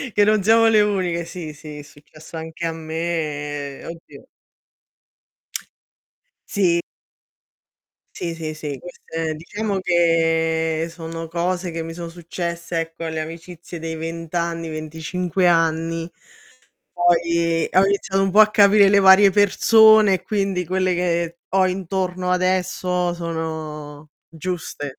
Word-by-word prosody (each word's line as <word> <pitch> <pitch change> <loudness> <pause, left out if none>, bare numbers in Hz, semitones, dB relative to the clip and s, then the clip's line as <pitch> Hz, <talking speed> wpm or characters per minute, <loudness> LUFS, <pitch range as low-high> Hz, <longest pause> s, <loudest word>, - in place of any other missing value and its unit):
Che 205 - +5
non 215 -1 +3
siamo 225 +2 +5
le 220 -1 +5
uniche. 185 -5 0
Sì, 165 -3 -7
sì 150 0 -10
è - - -7
successo 155 +3 -13
anche 160 +1 -6
a 165 - -1
me 155 -3 -4
oddio 165 0 -11 2.2
S. 175 -4 +2 1.3
Sì, 170 -2 -4
sì, 160 -1 -5
sì, 150 -3 -6
queste 165 -2 -5
diciamo 200 +5 -3
che 165 -2 +1
sono 165 0 -7
cose 175 +2 -2
che 165 0 -4
mi 165 0 -7
sono 170 0 -7
successe, 170 0 -4
ecco, 165 0 -5
alle 160 -1 -3
amicizie 165 +1 -9
dei 160 0 -5
20 165 0 -6
anni, 170 -1 -2
25 160 +4 -2
anni. 165 0 +1 0.8
Poi, 170 -1 +1
ho 190 - +5
iniziato 195 -1 0
un 195 - +1
po' 205 +3 +5
a 215 0 +7
capire 200 -1 +6
le 200 0 +5
varie 195 +1 +7
persone, 215 +1 +5
e 185 - -3
quindi 195 -4 -1
quelle 185 +1 0
che 170 -1 -1
ho 190 0 +3
intorno 185 0 -2
adesso 180 -1 0
sono 155 -3 -6 0.2
giuste. 160 -4 -6
170 Hz, 125 wpm, -21 LUFS, 160-185 Hz, 2.2 s, a